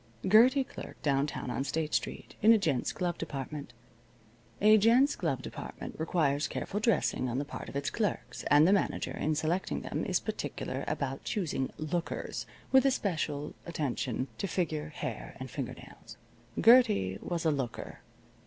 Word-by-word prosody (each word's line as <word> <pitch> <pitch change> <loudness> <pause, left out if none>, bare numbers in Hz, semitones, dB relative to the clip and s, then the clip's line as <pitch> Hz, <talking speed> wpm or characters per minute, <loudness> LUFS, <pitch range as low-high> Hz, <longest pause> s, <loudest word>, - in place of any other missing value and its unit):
Gertie 250 +7 +6
clerked - - -10
downtown 140 -3 0
on 135 - -1
State 150 +2 -2
Street, - - -2
in 220 - +7
a 225 - +7
gents' 155 - 0
glove 175 -2 -2
department. 145 -2 -5 0.9
A 215 +1 +7
gents' 240 +7 +5
glove - - -2
department - - -7
requires 155 -3 +1
careful 205 - -3
dressing 210 - +1
on 120 - -2
the 145 - -1
part - - -7
of - - -10
its 140 0 -1
clerks, 150 - -2
and 145 +3 +6
the 195 - +5
manager, 200 - 0
in 155 +1 0
selecting 160 +5 -1
them, - - -3
is - - +1
particular - - -4
about 135 -1 -2
choosing 165 - -1
"lookers," 160 +3 -3 0.2
with 265 -1 +7
especial 165 - -1
attention 135 -5 -2
to 195 - -1
figure, 160 -4 -1
hair, 150 - -6
and - - -7
finger - - -4
nails. - - -13 0.4
Gertie 220 - +5
was 170 -1 -3
a 160 - +4
looker. 135 -5 -4
160 Hz, 155 wpm, -31 LUFS, 140-205 Hz, 0.9 s, in